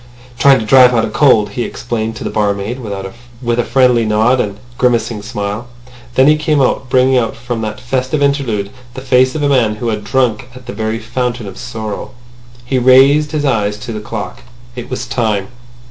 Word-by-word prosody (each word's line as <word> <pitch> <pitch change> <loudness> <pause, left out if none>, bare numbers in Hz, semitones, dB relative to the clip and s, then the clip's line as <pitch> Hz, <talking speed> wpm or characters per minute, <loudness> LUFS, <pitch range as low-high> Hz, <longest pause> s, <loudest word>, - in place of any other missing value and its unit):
"Trying 135 +2 +6
to 110 - -3
drive 125 +1 +6
out 115 -1 +2
a 110 - -6
cold," 110 -6 +4
he 120 - -4
explained 115 -1 -3
to - - -7
the - - -3
barmaid, 105 +3 -1 0.6
with 120 -1 -1
a - - +2
friendly 125 -3 +3
nod 110 +4 +2
and 100 -3 -4
a - - -20 0.2
grimacing 115 -3 0
smile. 105 +1 -4 0.5
Then 130 - +5
he 150 +2 +5
came 150 -1 +1
out, 130 -1 0
bringing 130 0 +3
out 115 -2 -2
from 120 0 -5
that 110 -1 -4
festive 130 +3 -2
interlude 130 -8 0 0.2
the 130 - -6
face 130 0 +2
of 150 - -2
a - - +3
man 120 -6 +2
who 115 +2 -3
had 105 -1 -3
drunk 120 +1 0
at 125 0 -12
the 125 - -6
very 110 +1 -2
Fountain 120 +1 -3
of 95 -2 -8
Sorrow. 110 +2 -6 0.5
He 130 +1 0
raised 135 +4 +5
his 150 -2 -1
eyes 105 -6 0
to 115 +2 -7
the 105 - -4
clock. 105 - -6 0.3
It - - -7
was - - -4
time. 105 -4 -1
120 Hz, 200 wpm, -15 LUFS, 110-130 Hz, 0.6 s, Trying